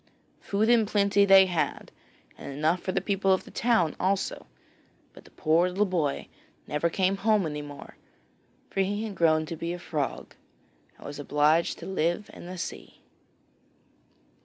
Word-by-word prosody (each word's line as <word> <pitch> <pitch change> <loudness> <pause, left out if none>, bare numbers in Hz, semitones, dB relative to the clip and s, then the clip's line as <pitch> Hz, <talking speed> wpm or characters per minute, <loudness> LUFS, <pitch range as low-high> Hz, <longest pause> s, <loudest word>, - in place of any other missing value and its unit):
Food 205 +2 0
in 230 -2 +4
plenty 200 -1 +3
they 195 -1 +8
had, 175 -3 -2 0.4
and - - -8
enough 155 +5 0
for 185 - -3
the - - -1
people 195 -1 +1
of 190 - +2
the - - -14
town 220 -9 +1
also, 190 +1 -1 0.7
but - - -15
the - - -16
poor 165 +3 +2
little 195 +3 +1
boy 165 -7 -1 0.4
never 150 +3 0
came 190 +2 +1
home 210 -2 +2
any 150 -1 -4
more, 145 -1 -11 0.7
for - - -3
he 205 +3 0
had 220 -2 -5
grown 160 -3 +2
to 165 - -6
be 165 +2 -4
a - - -5
frog, 155 -5 -4 0.6
and - - -15
was 145 0 -7
obliged 150 +3 +2
to 170 - -9
live 185 +1 -1
in - - -11
the 185 +1 -7
sea. - - -7
180 Hz, 165 wpm, -27 LUFS, 155-200 Hz, 0.7 s, they